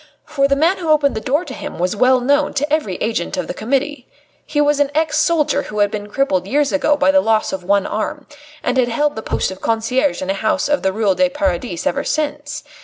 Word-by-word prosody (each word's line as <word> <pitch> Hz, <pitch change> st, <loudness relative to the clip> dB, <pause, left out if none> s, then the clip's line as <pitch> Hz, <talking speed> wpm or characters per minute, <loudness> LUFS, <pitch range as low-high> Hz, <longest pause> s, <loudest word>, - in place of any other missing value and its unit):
For 275 Hz, -2 st, +1 dB
the 275 Hz, -, +2 dB
man 330 Hz, +7 st, +2 dB
who 335 Hz, -3 st, -4 dB
opened 295 Hz, -2 st, +3 dB
the 220 Hz, -, -4 dB
door 290 Hz, +10 st, 0 dB
to 265 Hz, -, -7 dB
him -, -, -7 dB
was 180 Hz, +3 st, -1 dB
well 255 Hz, +4 st, +4 dB
known 285 Hz, +3 st, +1 dB
to 290 Hz, +2 st, -1 dB
every 255 Hz, -, 0 dB
agent 230 Hz, +8 st, -2 dB
of 275 Hz, -, -2 dB
the -, -, -5 dB
Committee. 275 Hz, +3 st, -2 dB, 0.4 s
He 295 Hz, -, -1 dB
was 295 Hz, 0 st, +3 dB
an 290 Hz, -1 st, +2 dB
ex 310 Hz, -1 st, +1 dB
soldier 305 Hz, -3 st, +2 dB
who 210 Hz, -, -8 dB
had 205 Hz, -1 st, +2 dB
been 205 Hz, -1 st, -5 dB
crippled 200 Hz, -7 st, 0 dB
years 285 Hz, +5 st, +1 dB
ago 290 Hz, 0 st, +2 dB
by 285 Hz, -, +3 dB
the 285 Hz, 0 st, +4 dB
loss 220 Hz, -5 st, +1 dB
of 190 Hz, -1 st, -4 dB
one 200 Hz, +1 st, +2 dB
arm, 240 Hz, +7 st, -3 dB, 0.4 s
and 250 Hz, -, 0 dB
had 245 Hz, -, +3 dB
held 290 Hz, +5 st, 0 dB
the 220 Hz, -, -5 dB
post -, -, -1 dB
of 190 Hz, -, -10 dB
concierge 250 Hz, +5 st, 0 dB
in 190 Hz, -, -1 dB
a -, -, +1 dB
house 220 Hz, +7 st, 0 dB
in 290 Hz, 0 st, +1 dB
the 190 Hz, -, +1 dB
Ruelle 205 Hz, -1 st, +1 dB
du 275 Hz, +7 st, +2 dB
Paradis 225 Hz, -, -2 dB
ever 280 Hz, -, 0 dB
since. 295 Hz, -1 st, -3 dB
275 Hz, 245 wpm, -18 LUFS, 215-295 Hz, 0.4 s, well